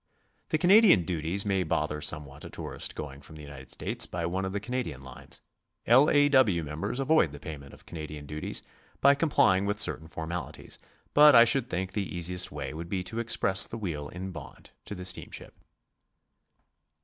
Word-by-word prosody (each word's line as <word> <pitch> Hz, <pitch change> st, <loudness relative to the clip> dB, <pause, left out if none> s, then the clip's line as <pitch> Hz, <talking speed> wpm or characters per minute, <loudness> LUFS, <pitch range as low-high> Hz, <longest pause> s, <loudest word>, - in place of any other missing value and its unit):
The -, -, +1 dB
Canadian 185 Hz, -, +6 dB
duties 85 Hz, +4 st, -1 dB
may 95 Hz, -2 st, +1 dB
boither 75 Hz, -3 st, -2 dB
somewhat 75 Hz, -2 st, -3 dB
a -, -, -8 dB
tourist -, -, -5 dB
gcxing 70 Hz, -1 st, -8 dB
from 80 Hz, -, -12 dB
the 75 Hz, -, -11 dB
United 70 Hz, -2 st, -11 dB
States -, -, 0 dB
by 85 Hz, -1 st, -4 dB
one 95 Hz, +3 st, -2 dB
of 95 Hz, -, -3 dB
the 100 Hz, -, -2 dB
Canadian 115 Hz, -, -4 dB
lines. 65 Hz, -, -4 dB, 0.4 s
L. 130 Hz, +6 st, +6 dB
A. 145 Hz, 0 st, +4 dB
W. 120 Hz, -, +3 dB
members 80 Hz, +10 st, -4 dB
avoid 135 Hz, -, +3 dB
the 75 Hz, -, -10 dB
payment 70 Hz, -2 st, -9 dB
of -, -, -16 dB
Canadian 75 Hz, -3 st, -8 dB
duties 75 Hz, +1 st, -3 dB, 0.4 s
by 140 Hz, -, +6 dB
complying 120 Hz, -, +2 dB
with 105 Hz, 0 st, -2 dB
certain 80 Hz, -6 st, 0 dB
formalities, 85 Hz, +1 st, -7 dB, 0.3 s
but 150 Hz, -1 st, +8 dB
I 115 Hz, 0 st, +9 dB
should 125 Hz, +1 st, +1 dB
think 95 Hz, +1 st, -3 dB
the 95 Hz, -4 st, -4 dB
easiest 90 Hz, +1 st, -1 dB
way -, -, -6 dB
would 85 Hz, +2 st, -7 dB
be 95 Hz, -1 st, -2 dB
to 110 Hz, +5 st, -5 dB
express 100 Hz, -4 st, +3 dB
the 115 Hz, -, -7 dB
wheel 80 Hz, -9 st, -5 dB
in 95 Hz, +2 st, -7 dB
bond 80 Hz, -5 st, -11 dB
to 105 Hz, -, -6 dB
the 90 Hz, -1 st, -8 dB
steamship. 90 Hz, -1 st, -5 dB
90 Hz, 185 wpm, -28 LUFS, 75-115 Hz, 0.4 s, I